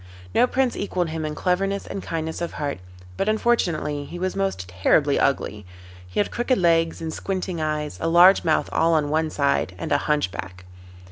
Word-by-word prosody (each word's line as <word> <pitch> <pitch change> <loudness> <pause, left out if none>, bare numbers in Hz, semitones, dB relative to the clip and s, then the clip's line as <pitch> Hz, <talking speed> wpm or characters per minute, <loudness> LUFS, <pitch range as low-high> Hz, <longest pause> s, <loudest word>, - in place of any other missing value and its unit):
No 250 - +4
prince 260 -1 0
equalled 180 -4 -2
him 160 0 -3
in 150 0 -4
cleverness 195 +3 0
and 195 - -5
kindness 160 -1 -4
of 170 - -3
heart, 145 -8 -3 0.4
but 200 - 0
unfortunately 170 -10 0
he 175 - -8
was 185 +1 -2
most 195 - -2
terribly 115 - +2
ugly. 105 -6 0 0.4
He 90 - -3
had 205 - +1
crooked 245 +1 0
legs 165 -2 +2
and 160 -1 -4
squinting 185 -3 -3
eyes, 150 -1 -2
a 165 - 0
large 175 +3 +6
mouth 160 -2 +1
all 165 0 +3
on 150 -2 +1
one 160 0 +1
side, 140 -11 0
and - - -5
a 145 - +3
hunchback. 95 -12 -2
160 Hz, 185 wpm, -23 LUFS, 145-185 Hz, 0.4 s, large